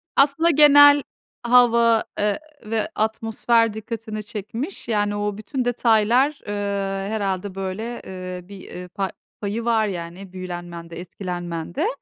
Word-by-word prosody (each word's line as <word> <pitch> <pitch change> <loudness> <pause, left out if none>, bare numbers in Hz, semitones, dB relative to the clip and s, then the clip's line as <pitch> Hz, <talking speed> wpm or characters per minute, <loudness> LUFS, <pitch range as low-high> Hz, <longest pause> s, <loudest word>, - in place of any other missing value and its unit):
Aslında, 285 +4 +4
genel 290 -1 +8 0.4
hava, 235 -2 +5 0.2
eee, 210 +5 +1 0.3
ve 220 0 -1
atmosfer 225 +1 +1
dikkatini 220 -1 -6
çekmiş. 230 - -6
Yani, 205 -2 0
o 205 -1 -2
bütün 245 +4 -3
detaylar, 245 +4 +3
ııı, 205 - -2 0.5
herhâlde 200 -3 -2
böyle, 195 +5 -4
ııı, 185 -1 -7
bir, 200 -1 -11
ııı, 180 0 -8
pa 195 +1 -3 0.3
payı 215 +3 -3
var, 225 -2 +2
yani, 180 0 -7
büyülenmende, 175 -2 -7
etkilenmende. 175 -2 -4
215 Hz, 120 wpm, -23 LUFS, 185-235 Hz, 0.5 s, genel